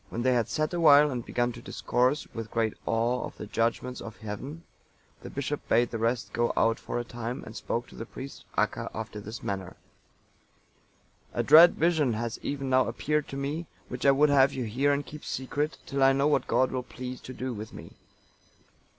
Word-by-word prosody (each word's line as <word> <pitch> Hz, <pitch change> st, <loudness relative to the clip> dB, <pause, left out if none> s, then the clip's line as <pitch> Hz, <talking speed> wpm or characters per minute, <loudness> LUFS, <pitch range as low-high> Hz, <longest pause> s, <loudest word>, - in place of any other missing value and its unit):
When 120 Hz, -, -3 dB
they 130 Hz, 0 st, +4 dB
had 120 Hz, -2 st, +1 dB
sat 155 Hz, +3 st, -1 dB
awhile 150 Hz, -3 st, +6 dB
and 125 Hz, -2 st, -3 dB
begun 120 Hz, 0 st, 0 dB
to 120 Hz, 0 st, -10 dB
discourse, 125 Hz, +4 st, 0 dB
with 115 Hz, -1 st, -5 dB
great 115 Hz, -1 st, 0 dB
awe, 115 Hz, +2 st, +1 dB
of -, -, -8 dB
the -, -, -6 dB
judgements 115 Hz, +4 st, -1 dB
of 115 Hz, -1 st, -8 dB
heaven, 130 Hz, +10 st, -7 dB, 0.6 s
the -, -, -8 dB
bishop 140 Hz, +1 st, -4 dB
bade 120 Hz, +1 st, +3 dB
the 115 Hz, -, -3 dB
rest 115 Hz, +1 st, -1 dB
go 120 Hz, 0 st, +1 dB
out 115 Hz, 0 st, +3 dB
for -, -, -4 dB
a 120 Hz, -, -1 dB
time, 120 Hz, +2 st, -5 dB
and 110 Hz, -, -10 dB
spoke 120 Hz, +1 st, -2 dB
to -, -, -14 dB
the 115 Hz, -, -7 dB
priest, 135 Hz, +2 st, -9 dB
Acca, -, -, 0 dB
after 110 Hz, -1 st, -5 dB
this 110 Hz, +3 st, -8 dB
manner: 95 Hz, -2 st, -4 dB, 1.6 s
"A -, -, +1 dB
dread 165 Hz, +3 st, +8 dB
vision 160 Hz, -7 st, +2 dB
has 115 Hz, +1 st, -3 dB
even 140 Hz, -1 st, -3 dB
now 130 Hz, 0 st, +4 dB
appeared 150 Hz, 0 st, -1 dB
to 135 Hz, -, -6 dB
me, 150 Hz, +4 st, -3 dB, 0.2 s
which 125 Hz, +1 st, -5 dB
I 140 Hz, -, +6 dB
would 145 Hz, +2 st, +5 dB
have 135 Hz, -1 st, +5 dB
you 130 Hz, -, -2 dB
hear 130 Hz, +6 st, +1 dB
and 140 Hz, 0 st, 0 dB
keep 150 Hz, 0 st, -10 dB
secret, 145 Hz, +4 st, -2 dB
till 140 Hz, 0 st, -2 dB
I 135 Hz, 0 st, +6 dB
know 140 Hz, +1 st, +2 dB
what 150 Hz, -, +2 dB
God 130 Hz, 0 st, +2 dB
will 130 Hz, -, -1 dB
please 125 Hz, 0 st, -7 dB
to 130 Hz, -, -8 dB
do 130 Hz, 0 st, -3 dB
with 110 Hz, 0 st, -7 dB
me. -, -, -10 dB
125 Hz, 205 wpm, -28 LUFS, 115-140 Hz, 1.6 s, dread